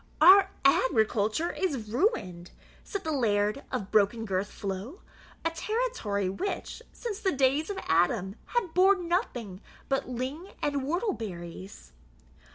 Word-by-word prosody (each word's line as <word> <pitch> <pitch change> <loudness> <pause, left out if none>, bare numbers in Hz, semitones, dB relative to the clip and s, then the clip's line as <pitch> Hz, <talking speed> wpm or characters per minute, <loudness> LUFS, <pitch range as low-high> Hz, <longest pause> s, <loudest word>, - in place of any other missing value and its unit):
"Our 385 +4 +8 0.2
agriculture 225 +2 +2
is 275 - -2
ruined," 200 - -1 0.3
said 400 - -5
the 315 - -2
Laird 215 -2 +1
of 205 -7 -3
Broken 215 +2 +3
girth 195 -1 -1
flow, 200 - -6 0.4
a 330 - +2
territory 330 - -1
which, 345 - -4
since 440 -4 -5
the 385 - +1
days 275 +4 +2
of 400 - -3
Adam, 180 +4 +2
had 440 -9 -1
borne 370 0 +4
nothing 240 - -2 0.3
but 270 -2 0
ling 265 +9 -5
and 285 -1 0
whortle 350 - 0
berries. 185 - -8
260 Hz, 130 wpm, -28 LUFS, -, 0.4 s, Our